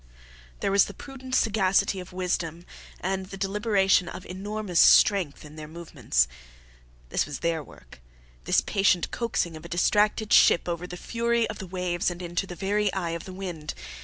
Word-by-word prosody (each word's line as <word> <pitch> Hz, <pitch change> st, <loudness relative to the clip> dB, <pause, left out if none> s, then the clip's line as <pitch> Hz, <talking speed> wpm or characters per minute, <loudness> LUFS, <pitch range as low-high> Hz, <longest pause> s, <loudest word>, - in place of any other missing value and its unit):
There -, -, 0 dB
was 200 Hz, 0 st, +5 dB
the 200 Hz, -, -9 dB
prudent 260 Hz, -1 st, -6 dB
sagacity 195 Hz, -2 st, +2 dB
of 180 Hz, 0 st, -9 dB
wisdom 175 Hz, -2 st, -3 dB, 0.4 s
and 190 Hz, 0 st, -2 dB
the 195 Hz, -, -8 dB
deliberation 195 Hz, -2 st, +2 dB
of 180 Hz, +1 st, -8 dB
enormous 195 Hz, -1 st, -3 dB
strength 185 Hz, -9 st, +5 dB
in 150 Hz, +1 st, -12 dB
their 155 Hz, -1 st, -7 dB
movements. 145 Hz, -, -1 dB, 0.8 s
This -, -, 0 dB
was 150 Hz, -, -6 dB
their 165 Hz, -2 st, 0 dB
work -, -, -16 dB, 0.4 s
this -, -, +3 dB
patient 195 Hz, -3 st, +1 dB
coaxing 215 Hz, -8 st, -1 dB
of 155 Hz, -, -10 dB
a 170 Hz, -, -10 dB
distracted 210 Hz, +4 st, +2 dB
ship 170 Hz, -, +6 dB
over 175 Hz, +1 st, -3 dB
the 180 Hz, -, -8 dB
fury 235 Hz, +2 st, 0 dB
of 215 Hz, -, -10 dB
the 190 Hz, -, -7 dB
waves 180 Hz, -1 st, -1 dB
and 175 Hz, -1 st, -7 dB
into 175 Hz, +2 st, -3 dB
the 175 Hz, -, -7 dB
very 200 Hz, +3 st, 0 dB
eye 175 Hz, -3 st, -2 dB
of 170 Hz, -1 st, -5 dB
the 190 Hz, -, -8 dB
wind. 175 Hz, -5 st, -6 dB
185 Hz, 175 wpm, -26 LUFS, 170-200 Hz, 0.8 s, ship